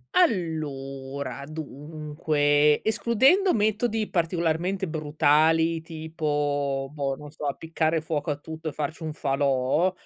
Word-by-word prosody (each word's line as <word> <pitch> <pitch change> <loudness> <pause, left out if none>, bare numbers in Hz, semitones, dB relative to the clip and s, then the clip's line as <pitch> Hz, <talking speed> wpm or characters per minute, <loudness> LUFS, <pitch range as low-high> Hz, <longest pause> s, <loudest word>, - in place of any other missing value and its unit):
Allora, 140 - -1
dunque, 150 -1 0
escludendo 260 - +3
metodi 220 +1 +1
particolarmente 175 +2 0
brutali 155 +1 +2
tipo 145 -4 -2
boh, 140 -2 -1
non 150 +1 -11
so, 150 -1 -5
appiccare 160 +2 0
fuoco 155 -1 -3
a 145 - 0
tutto 160 +2 -6
e - - -9
farci 155 +3 -4
un 160 -1 -3
falò, 135 +4 +1
155 Hz, 105 wpm, -26 LUFS, 145-165 Hz, -, escludendo